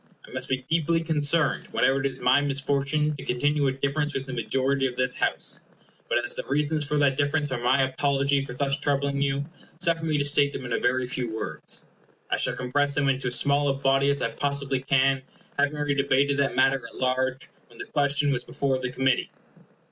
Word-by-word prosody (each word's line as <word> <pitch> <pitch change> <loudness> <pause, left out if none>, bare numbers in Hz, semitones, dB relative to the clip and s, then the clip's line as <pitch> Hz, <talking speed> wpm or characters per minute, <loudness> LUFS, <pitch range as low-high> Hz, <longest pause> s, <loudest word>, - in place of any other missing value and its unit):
I - - -15
must 130 +1 -4
be 130 -1 -2
deeply 165 0 +1
concerned 160 -1 +1
whenever 135 +1 +2
it 135 - +1
is 135 - -8
my 130 +3 +4
misfortune 145 +2 0
to - - -8
continue 145 +3 +1
a - - +2
difference 140 +2 -2
with 135 - -2
the 135 - -7
majority 135 +3 0
of 125 - -6
this 125 0 0
House; - - -1 0.5
but - - +2
as - - -3
the - - -4
reasons 150 +2 +1
for 150 +1 -1
that 140 -2 +2
difference 145 0 0
are 120 - -2
my 130 +3 +3
apology 140 +1 +1
for 125 - -7
thus 140 +2 0
troubling 140 -1 0
you, 140 0 0 0.3
suffer 165 -1 +2
me 155 -2 +1
to 145 - 0
state 145 0 +3
them 130 - -6
in 120 - -3
a - - +1
very 125 +1 +1
few 125 -1 -3
words. 110 0 -4 0.5
I - - +2
shall - - +1
compress 140 +3 0
them 140 -1 +1
into 130 -1 0
as 125 - +2
small 145 0 +2
a 135 - +1
body 135 0 +2
as 140 - 0
I - - 0
possibly 140 -1 -1
can, 135 0 +2 0.4
having 145 +1 +2
already 145 -1 0
debated 140 0 +2
that 140 -2 +1
matter 135 0 +3
at - - -11
large 130 0 -1 0.2
when 120 - -18
the - - -6
question 145 0 +1
was 130 - -1
before 135 -2 -1
the 125 -1 -3
Committee. 130 0 +1
140 Hz, 215 wpm, -26 LUFS, 130-145 Hz, 0.5 s, my